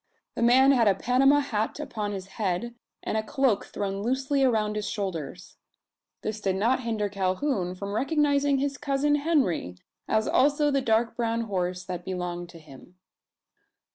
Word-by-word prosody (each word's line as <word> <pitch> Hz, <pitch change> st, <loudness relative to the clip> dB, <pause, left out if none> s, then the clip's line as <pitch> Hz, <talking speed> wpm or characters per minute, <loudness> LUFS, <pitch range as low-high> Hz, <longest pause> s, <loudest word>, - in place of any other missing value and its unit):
The -, -, -4 dB
man 255 Hz, +3 st, +6 dB
had 240 Hz, -5 st, +4 dB
a 195 Hz, -, +4 dB
Panama 270 Hz, +6 st, +3 dB
hat 220 Hz, -2 st, -2 dB
upon 215 Hz, -8 st, -4 dB
his 190 Hz, -2 st, -5 dB
head, 195 Hz, +3 st, -3 dB, 0.3 s
and -, -, -2 dB
a -, -, 0 dB
cloak 235 Hz, -1 st, 0 dB
thrown 195 Hz, -1 st, -4 dB
loosely 265 Hz, +4 st, 0 dB
around 215 Hz, -4 st, +1 dB
his 210 Hz, -1 st, -2 dB
shoulders. 180 Hz, -5 st, -5 dB, 0.7 s
This 215 Hz, 0 st, -4 dB
did 190 Hz, -2 st, 0 dB
not 230 Hz, +7 st, +2 dB
hinder 225 Hz, -4 st, -1 dB
Calhoun 190 Hz, 0 st, -1 dB
from 200 Hz, +2 st, -5 dB
recognising 285 Hz, +2 st, +2 dB
his 280 Hz, +1 st, -2 dB
cousin 290 Hz, 0 st, +1 dB
Henry, 285 Hz, -, +1 dB, 0.3 s
as 220 Hz, 0 st, +1 dB
also 290 Hz, +2 st, +3 dB
the 275 Hz, -1 st, +1 dB
dark 230 Hz, -1 st, +1 dB
brown 230 Hz, -1 st, -1 dB
horse 180 Hz, -4 st, -2 dB
that 180 Hz, -1 st, -6 dB
belonged 175 Hz, -2 st, -4 dB
to 170 Hz, -, -12 dB
him. 155 Hz, +3 st, -15 dB
220 Hz, 160 wpm, -26 LUFS, 190-270 Hz, 0.7 s, man